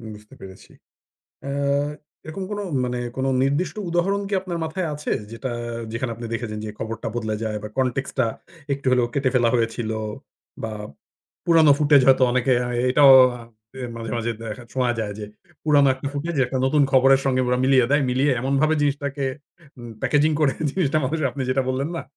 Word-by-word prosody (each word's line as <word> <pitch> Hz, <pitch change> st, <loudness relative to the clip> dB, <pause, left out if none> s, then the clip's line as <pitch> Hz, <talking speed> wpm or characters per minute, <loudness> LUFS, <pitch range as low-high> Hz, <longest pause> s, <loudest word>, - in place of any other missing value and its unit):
বুঝতে 105 Hz, 0 st, -16 dB
পেরেছি। 95 Hz, -1 st, -12 dB, 0.8 s
আ -, -, -3 dB, 0.7 s
এরকম 160 Hz, +5 st, -6 dB
কোনো 205 Hz, 0 st, -3 dB, 0.2 s
মানে 125 Hz, 0 st, -3 dB, 0.2 s
কোনো 135 Hz, +1 st, 0 dB
নির্দিষ্ট 150 Hz, +4 st, 0 dB
উদাহরণ 190 Hz, +4 st, +1 dB
কি -, -, -4 dB
আপনার 175 Hz, -3 st, -4 dB
মাথায় 170 Hz, +2 st, -3 dB
আছে? 150 Hz, +1 st, -4 dB, 0.2 s
যেটা 120 Hz, +2 st, -5 dB, 0.4 s
যেখানে 115 Hz, +1 st, -3 dB
আপনি 120 Hz, -, -8 dB
দেখেছেন 115 Hz, -2 st, -4 dB
যে, -, -, -5 dB
খবরটা 115 Hz, 0 st, -5 dB
বদলে 110 Hz, -2 st, -2 dB
যায় 105 Hz, -1 st, -2 dB
বা -, -, -4 dB
context 130 Hz, +1 st, -1 dB
টা 120 Hz, -, +3 dB, 0.5 s
একটু 140 Hz, 0 st, -7 dB
হলেও 125 Hz, -2 st, +3 dB
কেটে 135 Hz, -2 st, +1 dB
ফেলা 120 Hz, -2 st, +4 dB
হয়েছিল 115 Hz, -1 st, -1 dB, 0.7 s
বা 110 Hz, -, -3 dB, 0.7 s
পুরানো 160 Hz, -3 st, +6 dB
ফুটেজ 145 Hz, -2 st, +5 dB
হয়তো 130 Hz, -1 st, +6 dB
এ 125 Hz, -, 0 dB
অনেকে 125 Hz, +1 st, +2 dB
অ্যা 125 Hz, -, -2 dB, 0.2 s
এটাও 140 Hz, 0 st, +7 dB, 0.2 s
অ্যা 120 Hz, -1 st, -9 dB, 0.5 s
মাঝে, 115 Hz, -1 st, -6 dB
মাঝে 115 Hz, 0 st, -1 dB
দেখা, 115 Hz, +2 st, -6 dB
শোনা 125 Hz, -2 st, +1 dB
যায় 105 Hz, -2 st, -3 dB
যে, 105 Hz, -, -5 dB, 0.4 s
পুরানো 145 Hz, -2 st, +4 dB
একটা 140 Hz, +2 st, -6 dB
ফুটেজ 160 Hz, +3 st, -3 dB
একটা 130 Hz, +2 st, -3 dB
নতুন 145 Hz, +2 st, +3 dB
খবরের 135 Hz, +1 st, +5 dB
সঙ্গে 130 Hz, -1 st, +2 dB
ওরা 125 Hz, 0 st, +1 dB
মিলিয়ে 130 Hz, -3 st, +4 dB
দেয়। 145 Hz, 0 st, +3 dB
মিলিয়ে 135 Hz, +3 st, +2 dB
এমনভাবে 140 Hz, +4 st, +2 dB
জিনিসটাকে 140 Hz, -1 st, -1 dB, 0.5 s
উম 120 Hz, -1 st, -9 dB
প্যাকেজিং 150 Hz, +1 st, +2 dB
করে, 140 Hz, -3 st, +3 dB, 0.2 s
জিনিসটা 155 Hz, -4 st, 0 dB, 0.3 s
আপনি 135 Hz, -, -4 dB
যেটা 135 Hz, +1 st, +2 dB
বললেন, 135 Hz, +4 st, -1 dB
না? -, -, -5 dB
135 Hz, 175 wpm, -23 LUFS, 120-145 Hz, 0.8 s, এটাও